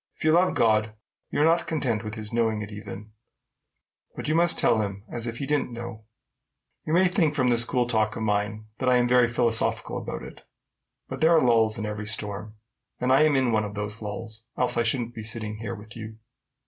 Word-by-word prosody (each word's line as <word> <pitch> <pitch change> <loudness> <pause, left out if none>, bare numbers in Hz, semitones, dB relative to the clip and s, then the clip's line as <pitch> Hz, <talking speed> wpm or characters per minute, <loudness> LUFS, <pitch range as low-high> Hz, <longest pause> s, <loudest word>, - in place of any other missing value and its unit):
If - - -9
you 155 - +4
love 175 +3 +3
God, 110 -1 +2 0.3
you - - -2
are - - +5
not 165 +1 +2
content 125 -9 -1
with 105 0 -6
his 110 0 -3
knowing 110 -2 +1
it 105 - -9
even, 105 +1 -9 1.0
but - - -6
you 155 - +1
must 170 +1 +4
tell 110 - +4
him 100 -1 -5
as 120 0 -3
if 115 0 -4
he 140 - -3
didn't 145 -2 0
know 120 -2 -8 0.8
it. - - -6
You - - +1
may 185 +2 +5
think 170 -5 +1
from 130 -4 +2
this 120 -1 +4
cool 125 0 0
talk 110 -3 +1
of 110 - -4
mine 105 0 -1
that 130 - +1
I 125 - +5
am 120 0 +2
very 125 -1 +4
philosophical 115 -1 0
about - - -6
it; - - -11 0.7
but - - -7
there 165 +1 +5
are - - +6
lulls 115 -4 +3
in 105 - -3
every 105 0 -5
storm, 105 0 -2 0.4
and 125 +1 +2
I 135 - +5
am 155 -2 +4
in 130 -3 +2
one 110 -1 +2
of 105 0 -6
those 105 +2 -4
lulls, 110 +1 -6
else 125 - +1
I 120 - +2
shouldn't 120 0 +1
be 115 - -7
sitting 110 -1 -3
here 110 -2 -5
with 105 +2 -12
you." 110 -1 -8
115 Hz, 225 wpm, -26 LUFS, 110-125 Hz, 1.0 s, are